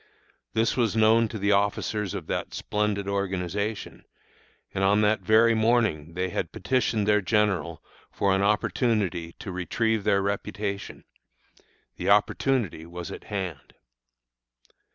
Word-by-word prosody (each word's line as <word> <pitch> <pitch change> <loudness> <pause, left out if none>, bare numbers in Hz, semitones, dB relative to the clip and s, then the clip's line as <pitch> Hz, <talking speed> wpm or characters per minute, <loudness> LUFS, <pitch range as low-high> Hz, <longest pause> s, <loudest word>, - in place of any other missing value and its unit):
This 110 0 +1
was 115 -4 +1
known 110 +1 +4
to 110 - -6
the 100 0 +1
officers 100 0 0
of 95 -5 -5
that - - -3
splendid 105 -1 -1
organization, 100 +1 -3 0.7
and 95 - -1
on 100 +2 +4
that 105 0 +3
very 110 +4 +5
morning 110 -9 +1
they 90 +1 -1
had - - -3
petitioned 120 -5 0
their 105 -1 +4
general 105 -4 0 0.3
for 100 -1 +1
an 95 - +1
opportunity 100 -4 0
to 95 - -8
retrieve 110 +4 -1
their 100 -1 +2
reputation. 100 0 -4 0.9
The - - -2
opportunity 120 -12 +2
was 85 0 -7
at - - -9
hand. 95 -8 -5
100 Hz, 130 wpm, -26 LUFS, 95-110 Hz, 0.9 s, very